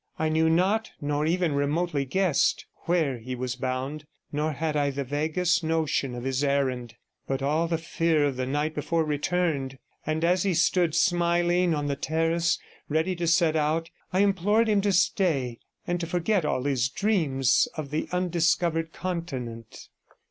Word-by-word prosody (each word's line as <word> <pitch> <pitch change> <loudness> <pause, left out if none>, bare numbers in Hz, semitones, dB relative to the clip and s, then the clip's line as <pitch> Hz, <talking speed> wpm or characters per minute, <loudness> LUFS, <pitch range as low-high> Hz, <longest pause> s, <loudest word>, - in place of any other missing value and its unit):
I 160 0 0
knew 160 +1 +2
not, 190 +7 +2
nor 145 +1 -1
even 175 -2 +1
remotely 145 +1 0
guessed, 185 +1 +1 0.2
where 160 -8 +1
he 125 +3 -5
was 125 0 -3
bound, 130 +4 -4 0.2
nor 150 +2 -1
had 155 +1 -2
I 145 -1 +2
the 140 0 -3
vaguest 160 +5 0
notion 155 -5 0
of 120 - -6
his 135 +1 -1
errand, 130 -4 0 0.3
but 135 0 -2
all 155 +4 +1
the 165 0 0
fear 165 -2 +1
of 140 -2 -1
the 130 0 -2
night 145 +3 -1
before 160 +2 0
returned; 150 -3 -1 0.3
and 155 +2 -1
as 180 +1 +3
he 190 -2 +1
stood, 170 -1 +2
smiling, 175 0 +2
on 145 -1 -2
the 140 -1 -1
terrace, 165 +3 0 0.3
ready 160 +5 0
to 170 -1 -2
set 165 -1 +3
out, 160 +2 0 0.2
I 185 - +2
implored 205 +3 +2
him 210 -2 +3
to 200 0 +1
stay, 165 - +1 0.3
and 175 0 -1
to 170 - -3
forget 175 +1 0
all 130 - 0
his 130 -3 +1
dreams 140 - +2
of 145 -3 -5
the 155 - -2
undiscovered 170 -2 +1
continent. 130 -11 -5
160 Hz, 165 wpm, -26 LUFS, 140-175 Hz, 0.3 s, as